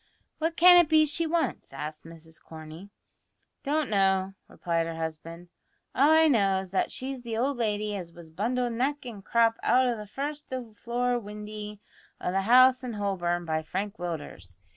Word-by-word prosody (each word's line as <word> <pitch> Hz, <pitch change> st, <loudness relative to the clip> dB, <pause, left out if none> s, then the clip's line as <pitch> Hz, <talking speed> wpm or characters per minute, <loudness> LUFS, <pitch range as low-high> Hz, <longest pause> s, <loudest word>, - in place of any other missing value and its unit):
"What 325 Hz, +1 st, -1 dB
can 355 Hz, +1 st, +8 dB
it 345 Hz, -3 st, +5 dB
be 310 Hz, -1 st, +5 dB
she 320 Hz, +3 st, -1 dB
wants?" 330 Hz, 0 st, -2 dB
asked 150 Hz, +3 st, -7 dB
Mrs 165 Hz, 0 st, -12 dB
Corney. 160 Hz, +4 st, -11 dB, 0.7 s
"Don't 300 Hz, 0 st, 0 dB
know," 195 Hz, -2 st, +1 dB
replied 165 Hz, -1 st, -2 dB
her 165 Hz, -, -5 dB
husband. 165 Hz, +2 st, -6 dB, 0.4 s
"All 280 Hz, +3 st, +4 dB
I 320 Hz, 0 st, +6 dB
know 200 Hz, -8 st, +3 dB
is 190 Hz, -1 st, -8 dB
that 190 Hz, -, 0 dB
she's 260 Hz, 0 st, -5 dB
the 230 Hz, -2 st, -5 dB
old 265 Hz, +3 st, 0 dB
lady 210 Hz, -2 st, -1 dB
as 175 Hz, -4 st, -6 dB
was 165 Hz, -1 st, -13 dB
bundled 240 Hz, +7 st, -1 dB
neck 270 Hz, +4 st, -1 dB
and 215 Hz, -5 st, -8 dB
crop 230 Hz, +1 st, +2 dB
out 255 Hz, +1 st, +3 dB
o' 245 Hz, -1 st, +1 dB
the 210 Hz, -1 st, -8 dB
first 290 Hz, +6 st, -5 dB, 0.2 s
floor 245 Hz, +2 st, -1 dB
windy 210 Hz, -1 st, -8 dB, 0.4 s
o' -, -, -2 dB
the 195 Hz, +1 st, +1 dB
house 255 Hz, +1 st, +6 dB
in 245 Hz, -2 st, -4 dB
Holborn 175 Hz, -4 st, -2 dB
by 160 Hz, -1 st, -1 dB
Frank 195 Hz, +6 st, -4 dB
Willders. 150 Hz, -, -7 dB
210 Hz, 175 wpm, -27 LUFS, 175-255 Hz, 0.7 s, can